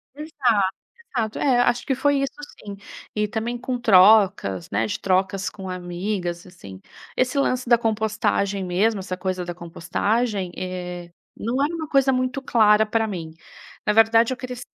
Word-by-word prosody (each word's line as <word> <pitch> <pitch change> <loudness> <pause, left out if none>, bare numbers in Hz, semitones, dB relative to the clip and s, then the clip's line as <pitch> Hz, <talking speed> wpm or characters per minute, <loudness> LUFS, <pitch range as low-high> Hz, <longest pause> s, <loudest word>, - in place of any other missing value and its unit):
Exato, 250 - 0 0.4
exato. 220 -2 -1
É, 255 -4 +3
acho 240 0 +1
que 270 - +1
foi 285 +2 +2
isso 275 - -2 0.3
sim. 200 -1 -7 0.4
E 210 0 +1
também 225 +3 -3
com 250 +1 -3
trocas, 190 - +4
né, 115 - 0
de 105 - -4
trocas 190 0 0
com 190 -2 -8
amigas, 180 0 -4
assim. 100 - -12 0.4
Esse 255 +2 +1
lance 255 -2 0
da 235 -1 +6
compostagem 215 -3 0
mesmo, 195 +4 +1
essa 185 -1 -5
coisa 185 -1 -3
da 175 0 -6
compostagem, 190 +4 -2
eh, 180 -1 -6 0.3
não 245 +5 -1
era 315 +4 -2
uma 320 -2 -5
coisa 275 -2 +3
muito 255 +2 -1
clara 215 -4 +4
pra 225 +1 0
mim. 165 -5 -6 0.5
Na 210 - +3
verdade 225 +2 +5
eu - - -3
cresci 250 -1 -7
215 Hz, 160 wpm, -23 LUFS, 185-245 Hz, 0.5 s, da